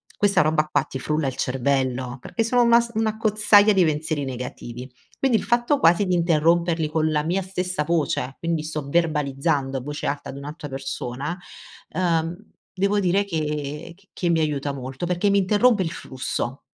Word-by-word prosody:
questa 200 -2 +3
roba 155 0 +2
qua 155 - +1
ti 130 - -7
frulla 150 +1 -1
il 130 - -3
cervello, 130 -1 -1
perché 225 - -2
sono 245 +2 +2
una 235 0 +6
s 235 - -7
un'accozzaglia 215 -1 +4
di 190 -2 +4
pensieri 150 -1 -1
negativi, 125 -1 -7 0.3
quindi 260 -4 +3
il - - -4
fatto 240 +4 +2
quasi 170 +4 +4
di 180 - +1
interromperli 170 -1 +2
con 155 0 +1
la 150 -1 +1
mia 180 +4 0
stessa 180 -3 -2
voce, 150 -5 -1
quindi 165 -2 -1
sto 155 -2 -5
verbalizzando 145 -3 0
a 130 - -4
voce 150 +4 -5
alta 140 0 -3
ad 135 - -7
un'altra 145 +1 -7
persona, 135 +4 -4 0.5
ehm, 170 -2 0 0.4
devo 200 +2 +1
dire 195 +2 +2
che 150 -2 -4
c 195 +1 -26
che 175 - -1
mi 165 -1 +3
aiuta 145 -2 -1
molto, 130 +4 -5
perché 180 +3 +1
mi 200 - +3
interrompe 205 +2 +3
il 165 - -3
flusso. 130 -3 -4
160 Hz, 175 wpm, -23 LUFS, 140-190 Hz, 0.5 s, una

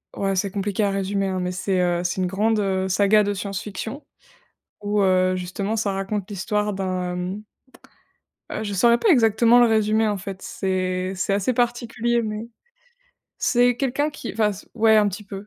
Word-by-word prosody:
Ouais 195 0 -1
c'est 200 +2 0
compliqué 200 +1 -1
à 200 - +2
résumer 195 0 -1
hein, 190 -1 -2
mais 180 0 -2
c'est, 185 +1 -1
heu, 175 -1 0
c'est 180 +1 -1
une 185 - +1
grande, 210 +4 +1
heu, 190 -2 0
saga 205 +3 +4
de 205 0 -1
science-fiction 205 +6 -5 0.8
où, 205 0 0
heu, 185 -1 +3
justement 195 +4 -3
ça 210 -2 0
raconte 195 0 -3
l'histoire 210 +1 -1
d'un 185 -2 -3
mmh 185 +4 -4 1.1
heu 215 - -4
je 205 -2 -4
saurais 235 +5 +4
pas 445 - +1
exactement 235 - +5
le 240 - +6
résumer 220 0 +2
en 205 -1 -1
fait, 190 0 -7
c'est 185 -1 -2
c'est 190 +1 -1
assez 200 +5 +1
particulier 240 0 0
mais, 215 0 -4 0.9
c'est 245 0 +3
quelqu'un 275 +3 0
qui 285 - -7
enfin 215 -1 +1
c 195 - -11
ouais 220 -1 +4
un 210 -1 +4
petit 205 +2 -6
peu. 200 0 -8
205 Hz, 180 wpm, -23 LUFS, 190-220 Hz, 1.1 s, le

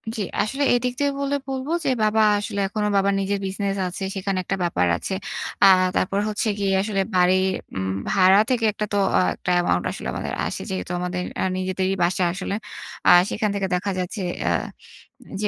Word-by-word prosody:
জি। 220 - -3 0.2
আসলে 270 +6 -1
এদিক 245 0 0
থেকে 285 0 +2
বললে 280 0 0
বলবো 265 +3 -3
যে - - +2
বাবা 215 +1 +3 0.2
আসলে 205 0 -4
এখনো 210 +1 -2
বাবার 200 0 +3
নিজের 200 +1 -1
বিজনেস 195 +1 -2
আছে, 180 +2 -6
সেখানে 195 0 -2
একটা 195 - -2
ব্যাপার 170 - +1
আছে। 190 - -5 0.5
আ - - +10 0.3
তারপর 195 +2 +1
হচ্ছে 215 +2 -2
গিয়ে 195 -1 +1
আসলে 200 -1 -1
বাড়ির 185 +1 +4 0.3
উম 95 0 -2 0.2
ভাড়া 190 +1 +5
থেকে 240 -3 +1
একটা 210 0 -3
তো - - +2 0.2
আ - - +5 0.2
একটা - - -6
অ্যামাউন্ট 130 - +1 0.3
আমাদের - - -4
আসলে - - -3
আসে। - - -5
যেহেতু 90 -1 -4
আমাদের 180 0 -3 0.2
আ - - +1
নিজেদেরই 185 +1 -1
বাসা 180 +1 +1
আসলে। 195 +1 -3 0.5
আ - - +8 0.2
সেখান 215 -1 -1
থেকে 195 -1 -1
দেখা 195 +3 -2
যাচ্ছে 185 +3 -4 0.3
আ - - +3 0.9
যে 210 - +1
195 Hz, 185 wpm, -23 LUFS, 185-210 Hz, 0.9 s, আ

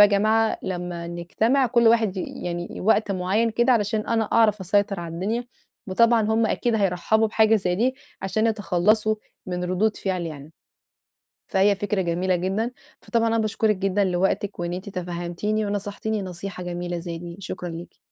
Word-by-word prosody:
يا - - +10
جماعة 215 +2 +2
لمّا 175 -2 -4
نجتمع 215 +10 +1
كل 235 -1 +4
واحد 225 -4 +3
ي 185 - -2 0.2
يعني 175 0 -3
ي - - -6
وقت 215 +1 +2
معين 195 +5 +1
كده 240 +3 +3
علشان 215 -1 0
أنا 225 -1 +1
أعرف 210 -2 +3
أسيطر 200 0 +1
على 165 -1 -6
الدنيا، 215 +8 -2 0.4
وطبعًا 230 +4 +4
هم 220 +1 +2
أكيد 240 0 0
هيرَحبوا 205 +2 +2
بحاجة 220 +1 +4
زي 180 -3 0
دي 250 +6 +1 0.3
عشان 215 +3 +1
يتخلصوا 215 0 +2 0.3
من 180 -1 -3
ردود 190 +4 +1
فعلي 185 -3 -2
يعني. 150 0 -10 0.9
فهي 200 +1 +3
فكرة 205 0 -1
جميلة 180 +1 0
جدًا، 195 +6 -1 0.3
فطبعًا 230 -1 0
أنا 225 0 +1
باشكرِك 215 -1 +1
جدًا 195 +1 +1
لوقتِك 190 +2 0
وإن 175 0 -2
أنِت 185 +2 -5
تفهمتيني، 180 +3 -2
ونصحتيني 205 +1 -3
نصيحة 185 0 -6
جميلة 175 0 -4
زي 170 -1 -5
دي، 170 +1 -8
شكرًا 185 -2 -5
ليكِ. 170 +1 -8
200 Hz, 165 wpm, -24 LUFS, 180-220 Hz, 0.9 s, يا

